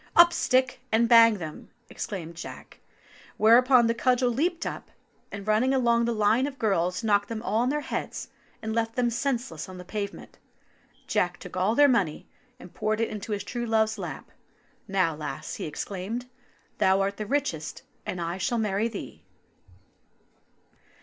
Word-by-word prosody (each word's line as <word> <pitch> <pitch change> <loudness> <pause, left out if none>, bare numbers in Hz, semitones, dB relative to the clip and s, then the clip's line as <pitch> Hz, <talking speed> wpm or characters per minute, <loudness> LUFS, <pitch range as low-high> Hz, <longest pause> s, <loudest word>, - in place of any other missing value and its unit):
"Up, 345 0 +8
stick, 255 -3 +1
and 230 +1 +3
bang 230 -2 +7
them!" 160 -4 -8 0.2
exclaimed 170 -5 -6
Jack; 170 - -10 0.6
where 225 +2 +7
upon 255 -1 +5
the 230 - +2
cudgel 250 +1 +2
leaped 330 +7 -1
up, - - -5 0.4
and 200 -1 -7
running 225 +5 +2
along 235 -2 +3
the 235 - 0
line 220 +4 +2
of 275 -1 -7
girls, 180 -3 0
knocked 205 -2 +2
them 225 -1 -4
all 220 -1 0
on 250 - +1
the 295 +2 0
heads - - -4 0.3
and 220 0 -2
left 225 0 -1
them 245 -1 +1
senseless 235 - -2
on 185 - -9
the 180 - -9
pavement. 200 +1 -6 0.7
Jack 175 -1 0
took 180 - -10
all 190 +5 +1
their 290 +2 +7
money 200 - 0 0.3
and 180 - -13
poured 215 0 -1
it 230 - 0
into 215 +1 -6
his 205 -1 -2
true 240 +5 -4
love's 220 -1 +1
lap. 180 - -7 0.6
"Now, 185 -5 +1
lass," 150 0 -6
he - - -4
exclaimed, 200 +9 -5 0.5
"thou 190 +1 +4
art 200 +1 -1
the 215 - -4
richest, 225 - -2 0.2
and 180 - -4
I 170 +2 -3
shall 235 +6 0
marry 210 0 0
thee." 220 -4 -8
220 Hz, 170 wpm, -27 LUFS, 190-240 Hz, 0.7 s, Up